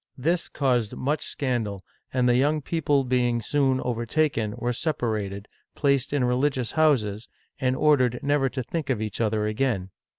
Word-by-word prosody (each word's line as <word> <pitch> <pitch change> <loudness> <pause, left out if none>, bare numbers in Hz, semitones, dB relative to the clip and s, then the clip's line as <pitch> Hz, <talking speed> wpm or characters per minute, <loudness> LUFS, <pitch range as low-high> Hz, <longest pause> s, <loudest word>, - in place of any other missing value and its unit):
This 165 +6 0
caused 125 -6 0
much 145 +4 -1
scandal, 115 -8 -2 0.3
and 125 -1 +2
the 120 - +4
young 145 +4 +2
people 145 -3 +1
being 125 -2 +1
soon 135 +2 +1
overtaken, 120 -2 0
were 120 +1 -1
separated, 110 - -2 0.3
placed 140 -2 +1
in 140 -3 +1
religious 125 0 +1
houses, 120 -9 +1 0.3
and 130 0 +1
ordered 130 -4 +3
never 140 -1 +2
to 130 0 -4
think 155 +3 -4
of 125 -5 +1
each 110 +1 -3
other 110 -1 +1
again. 105 -4 -1
125 Hz, 155 wpm, -25 LUFS, 115-140 Hz, 0.3 s, the